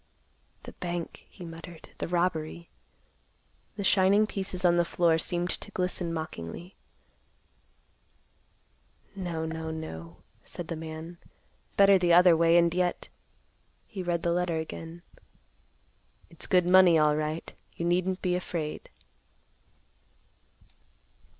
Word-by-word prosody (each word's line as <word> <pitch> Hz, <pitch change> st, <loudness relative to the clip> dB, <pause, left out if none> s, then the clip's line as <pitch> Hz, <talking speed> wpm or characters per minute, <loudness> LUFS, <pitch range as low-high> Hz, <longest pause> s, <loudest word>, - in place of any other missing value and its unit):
"The -, -, -9 dB
bank," 175 Hz, -1 st, -6 dB
he 180 Hz, -, -11 dB
muttered; 165 Hz, 0 st, -10 dB
"the -, -, -2 dB
robbery." 170 Hz, -1 st, -2 dB, 1.0 s
The 200 Hz, -, -4 dB
shining 195 Hz, +2 st, +4 dB
pieces 190 Hz, -3 st, -3 dB
on 175 Hz, 0 st, +5 dB
the 175 Hz, -, +4 dB
floor 170 Hz, -1 st, +2 dB
seemed 175 Hz, +2 st, -1 dB
to -, -, -5 dB
glisten 180 Hz, -3 st, -2 dB
mockingly; 160 Hz, -, -6 dB, 2.4 s
"No, 170 Hz, -4 st, -3 dB
no, 160 Hz, 0 st, -4 dB
no," 90 Hz, -, -8 dB, 0.2 s
said 175 Hz, -3 st, -8 dB
the 165 Hz, -, -2 dB
man. 160 Hz, +2 st, -8 dB, 0.6 s
"Better 195 Hz, -1 st, +7 dB
the 175 Hz, -1 st, +3 dB
other 175 Hz, 0 st, +7 dB
way, 165 Hz, +1 st, +4 dB
and 170 Hz, -1 st, +4 dB
yet—" 180 Hz, 0 st, -1 dB, 0.8 s
He 195 Hz, -, -7 dB
read 175 Hz, -2 st, -1 dB
the 170 Hz, -, +1 dB
letter 175 Hz, -2 st, 0 dB
again. 165 Hz, +1 st, -7 dB, 1.3 s
"It's -, -, -6 dB
good 180 Hz, -2 st, +4 dB
money, 180 Hz, -2 st, +6 dB
alright; 155 Hz, +1 st, 0 dB, 0.2 s
you 170 Hz, -, -3 dB
needn't 180 Hz, +2 st, 0 dB
be 180 Hz, -2 st, +1 dB
afraid." 165 Hz, -4 st, -4 dB
170 Hz, 115 wpm, -28 LUFS, 160-180 Hz, 2.4 s, Better